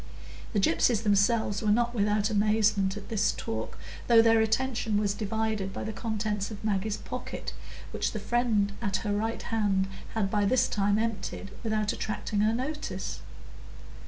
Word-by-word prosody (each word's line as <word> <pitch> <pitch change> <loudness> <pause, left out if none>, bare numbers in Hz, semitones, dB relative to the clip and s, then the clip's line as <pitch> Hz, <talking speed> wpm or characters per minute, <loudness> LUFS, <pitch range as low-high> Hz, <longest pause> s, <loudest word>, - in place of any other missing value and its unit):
The 210 - +2
gypsies 200 +5 +3
themselves 205 0 +2
were 215 - 0
not 235 +3 +2
without 210 -1 +1
amazement 210 -2 +2
at 205 - -9
this 210 -2 +2
talk, 110 0 -5 0.3
though 235 -1 +7
their 225 -1 +5
attention 220 -1 +1
was 205 -1 +1
divided 215 -1 -2
by - - -5
the 220 - -4
contents 210 -3 -2
of 215 -2 -8
Maggie's 210 0 0
pocket, - - -6 0.4
which - - -1
the - - -4
friend 230 -4 +1
at 200 -4 0
her 205 - +1
right 225 +2 -2
hand 205 -4 +1 0.3
had 200 -3 0
by 205 -1 +2
this 255 +4 +3
time 200 0 +1
emptied 220 -3 -3
without 215 -2 0
attracting 210 -1 -3
her 215 +1 +3
notice. 295 +5 -4
215 Hz, 160 wpm, -28 LUFS, 205-225 Hz, 0.4 s, though